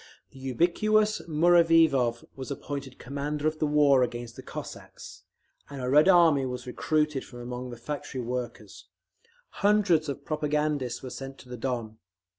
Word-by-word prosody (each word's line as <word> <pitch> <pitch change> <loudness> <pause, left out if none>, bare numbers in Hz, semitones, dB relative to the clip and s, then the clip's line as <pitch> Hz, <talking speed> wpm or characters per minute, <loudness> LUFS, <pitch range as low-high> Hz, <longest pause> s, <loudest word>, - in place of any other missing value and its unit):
The 135 - -14
ubiquitous 210 - +1
Muraviov 165 -7 +4
was 130 0 -7
appointed 140 -2 -6
commander 145 +3 -3
of 155 0 -2
the 155 - +1
war 145 -3 +4
against 120 -1 -3
the - - -9
Cossacks, - - -9 0.5
and 140 -1 -7
a 125 0 -2
Red 150 +6 +6
Army 165 -6 +5
was 125 0 -6
recruited 150 +2 0
from 120 - -12
among 125 +1 -6
the 120 - -8
factory 130 +1 -5
workers. 120 -5 -6 0.7
Hundreds 200 -7 +3
of 140 - -6
propagandists 150 -5 -1
were 130 - -6
sent 135 +2 -8
to 125 - -15
the 125 - -6
Don. 115 -3 -4
140 Hz, 150 wpm, -27 LUFS, 125-155 Hz, 0.7 s, Red